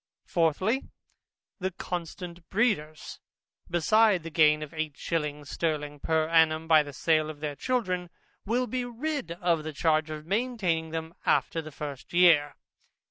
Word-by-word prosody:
Fourthly, 185 - +1 0.7
The 190 0 -1
constant 175 -1 -6
breeders, 175 -9 -1 0.5
besides 190 +2 +3
the 165 - -7
gain 150 -1 +4
of 150 - -9
eight 155 -3 -4
shillings 150 -3 -3
sterling 150 -3 -2
per 160 +1 +1
annum 160 -1 +3
by 160 -1 +7
the 145 -1 -7
sale 155 +2 +1
of 155 -2 -8
their 150 -1 -4
children, 185 - -1 0.3
will 240 +4 0
be 255 0 -2
rid 245 - -3
of 170 -2 0
the 155 0 -5
charge 155 +1 +1
of 155 0 -6
maintaining 195 -6 0
them 160 0 -5
after 165 - +1
the 155 0 -10
first 145 -1 -7
year. 165 -5 +5
165 Hz, 145 wpm, -28 LUFS, 155-185 Hz, 0.7 s, by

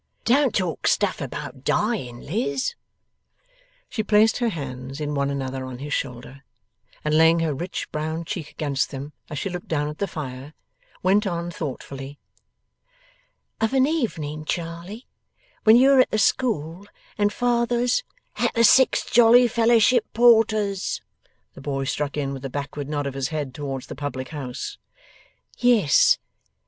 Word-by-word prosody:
'Don't 265 0 +3
talk 180 -4 -1
stuff 200 -4 +1
about 135 0 -6
dying, 180 - -1
Liz.' 140 - -2 1.1
She 225 - -2
placed 215 +1 +4
her 240 -2 +1
hands 135 - -6
in 150 -1 -3
one 140 -1 0
another 135 -1 -3
on 130 -1 -7
his 145 +3 -5
shoulder, 130 +1 -5 0.6
and 150 0 +2
laying 165 +1 +5
her 160 -2 0
rich 175 +7 -4
brown 160 +2 -3
cheek 155 -1 -5
against 140 -3 -2
them 140 +2 -7 0.2
as 150 - -5
she 195 - -2
looked 180 -2 -6
down 150 -2 -1
at 150 +1 -7
the 200 - 0
fire, 140 -3 -7 0.5
went 200 +3 +3
on 170 -1 -3
thoughtfully: 140 -2 -6 1.4
'Of 225 +4 +1
an 260 0 +5
evening, 160 - -2
Charley, 170 +8 -5 0.6
when 220 +1 +8
you 265 +3 +6
are 270 - +6
at 255 - +5
the - - -1
school, 200 - 0 0.3
and 205 0 +1
father's 240 - +1 0.2
' - - -46
'At - - 0
the 230 - +4
Six 260 +3 +5
Jolly 240 +1 +6
Fellowship 230 0 +3
Porters,' 215 -4 +3 0.5
the - - -12
boy 135 -1 -2
struck 145 +1 -2
in, 140 -2 -2
with 135 -1 -7
a 135 - -4
backward 145 +1 -5
nod 145 -1 -2
of 140 - -3
his 135 -1 -2
head 150 -5 -4
towards 135 -2 -5
the - - -8
public 130 -2 -5
house. 135 -4 -6 0.8
'Yes. 245 - +5
160 Hz, 155 wpm, -24 LUFS, 140-220 Hz, 1.4 s, when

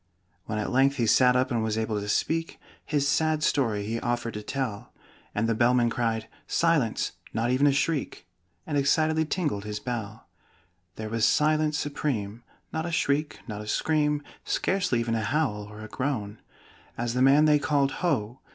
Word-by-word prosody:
When 105 - -3
at 105 - -2
length 135 +2 +3
he 120 -4 +1
sat 125 +3 +5
up 130 +1 +1
and 115 -2 +1
was 110 0 -1
able 110 -1 -1
to 105 - -5
speak, 165 +9 -1 0.2
His 145 -2 0
sad 155 +1 +1
story 110 -10 +1
he 115 +2 -2
offered 120 -1 -2
to 105 - -5
tell; 120 -2 -4 0.4
And 105 +2 +1
the 115 - +2
Bellman 120 +1 +3
cried 115 -2 -1 0.2
"Silence! 165 -9 +1 0.2
Not 115 +2 +1
even 135 +3 +3
a - - +5
shriek!" 145 - -1 0.4
And 145 -3 0
excitedly 155 +3 +2
tingled 150 - -1
his 105 0 -4
bell. 115 -3 -5 0.7
There 110 0 -5
was 115 0 -1
silence 155 +2 +3
supreme! 120 -8 -3 0.3
Not 160 +1 -2
a - - -4
shriek, 150 -1 0
not 105 -2 -5
a 105 - -9
scream, 150 +3 +1 0.2
Scarcely 180 -10 0
even 115 0 -1
a 115 - 0
howl 110 -3 -1
or 105 +1 -10
a - - -7
groan, 110 -4 -3 0.6
As 120 0 -2
the 125 - 0
man 140 +3 +6
they 150 -1 +5
called 140 -2 +1
"Ho!" 130 - 0
125 Hz, 180 wpm, -27 LUFS, 110-150 Hz, 0.7 s, man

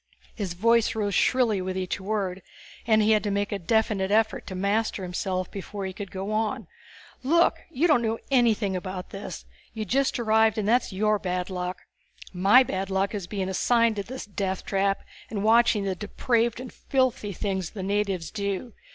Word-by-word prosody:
His 190 -6 -4
voice 230 +4 +3
rose 205 -2 -1
shrilly 225 -2 +2
with 185 0 -3
each 185 +1 -2
word, 195 -2 -2 0.5
and 220 -1 +4
he 215 - +3
had 215 -1 +4
to 210 - -1
make 200 0 -1
a 205 - -2
definite 205 0 +1
effort 220 +1 +1
to 185 - -5
master 200 +1 0
himself 185 0 -3
before 200 0 -6
he 190 - -4
could 200 +1 -7
go 195 +2 -5
on. 215 0 -1 0.6
"Look. 335 +6 +3
You 325 0 0
don't 300 -8 +4
know 225 -1 0
anything 225 -6 +3
about 185 0 -5
this. 195 +1 -7 0.3
You 220 -1 -3
just 265 +4 +1
arrived 220 -1 +3
and 210 -2 -1
that's 240 +1 +2
your 210 +2 +1
bad 180 0 -3
luck. 180 0 -4 0.5
My 195 +8 +6
bad 190 -5 -3
luck 195 +1 0
is 200 -4 -4
being 195 -2 -3
assigned 230 +4 +2
to - - 0
this 255 +5 -7
death 195 -2 -3
trap 195 0 +1 0.3
and 205 -3 -3
watching 230 -1 +4
the 195 -1 -1
depraved 230 +4 0
and 255 0 -8
filthy 255 -6 0
things 190 -2 -2
the 195 - -7
natives 195 -4 -1
do. 200 +2 -3
205 Hz, 185 wpm, -26 LUFS, 190-225 Hz, 0.6 s, My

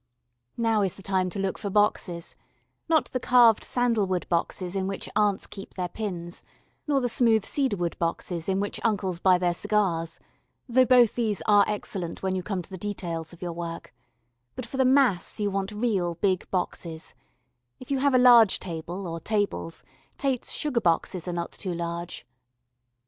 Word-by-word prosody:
Now 225 -2 +2
is 190 -3 -1
the 195 - -14
time 185 -1 0
to 190 - -7
look 195 -1 -2
for 205 - -3
boxes 190 -4 0 0.5
not 320 -2 +2
the 255 - -1
carved 240 -3 +5
sandal 235 -5 +1
wood 185 -1 -1
boxes 175 +2 -1
in 190 -1 -1
which 195 0 -4
aunts 205 -2 +2
keep 195 -1 -10
their 180 -2 -2
pins, 175 -4 -5 0.4
nor 280 -2 +2
the 245 - +1
smooth 225 -3 +2
cedarwood 205 - -1
boxes 170 +1 -2
in 190 0 +1
which 205 +1 -3
uncles 190 -6 0
buy 185 0 +5
their 180 -1 +1
cigars, 170 -4 0 0.5
though 255 +1 +4
both 245 -3 +5
these 220 -5 -1
are 205 -1 +6
excellent 190 -5 -4
when 190 -1 0
you 185 - -1
come 185 -1 -3
to - - -17
the 185 - -7
details 170 -5 -4
of 175 0 -11
your 175 -1 -3
work, 170 0 -6 0.6
but 255 - -5
for 255 +3 -7
the 265 - +3
mass 255 -9 +3
you 205 -1 0
want 195 +1 -2
real 205 -6 0
big 185 +1 0
boxes; 170 -3 -4 0.7
if 255 - -10
you 275 - +1
have 280 -1 +3
a - - +7
large 240 -5 +7
table, 175 +2 -6
or 165 -1 -4
tables, 205 -4 -2 0.3
Tate's 270 -3 -1
sugar 265 -6 0
boxes 175 0 0
are 180 - -2
not 170 0 -3
too 185 -4 -4
large. 170 0 -5
195 Hz, 180 wpm, -26 LUFS, 175-225 Hz, 0.7 s, a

